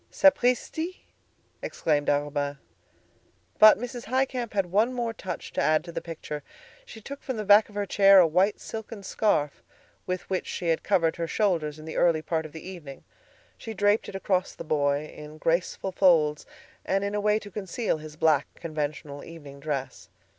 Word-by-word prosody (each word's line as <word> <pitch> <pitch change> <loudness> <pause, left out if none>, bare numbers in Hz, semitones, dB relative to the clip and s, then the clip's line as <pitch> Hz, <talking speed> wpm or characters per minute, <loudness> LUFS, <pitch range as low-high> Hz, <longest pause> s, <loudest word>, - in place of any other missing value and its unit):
"Sapristi!" 290 +6 +2 0.6
exclaimed 145 -3 0
Arobin. 145 0 -1 1.0
But 215 0 +9
Mrs. 245 +1 -6
Highcamp 255 -1 -1
had 195 -2 +1
one 220 +6 +3
more 235 -2 -2
touch 190 -4 -7
to - - 0
add 155 0 +3
to 170 - -9
the - - -4
picture. 155 -3 -6 0.5
She 220 - -11
took 280 +6 -8
from 260 -3 -4
the 215 - -3
back 205 +2 +6
of 205 - -16
her 205 0 -1
chair 195 0 +6
a 180 - +8
white 185 +6 +2
silken 220 -2 -7
scarf, 170 -8 0 0.5
with 185 0 -3
which 190 -1 -2
she 175 - -3
had 165 - +1
covered 165 -5 +1
her 170 -1 -2
shoulders 165 -6 0
in 155 - -11
the 160 - -6
early 165 -3 +3
part 160 -1 -2
of - - -18
the 160 +3 -9
evening. 160 -8 -9 0.6
She 225 -2 -7
draped 205 +2 +2
it - - -9
across 190 -1 -1
the - - -7
boy 145 -1 0
in 150 0 -11
graceful 170 +4 -1
folds, 160 -6 +3 0.4
and 195 +1 0
in 200 0 -2
a 210 - -1
way 210 +1 +3
to 205 -2 -8
conceal 200 -2 -2
his 155 0 -10
black, 155 -3 +2
conventional 150 -3 -5
evening 145 -4 -11
dress. 135 -3 -4
180 Hz, 180 wpm, -27 LUFS, 155-210 Hz, 1.0 s, But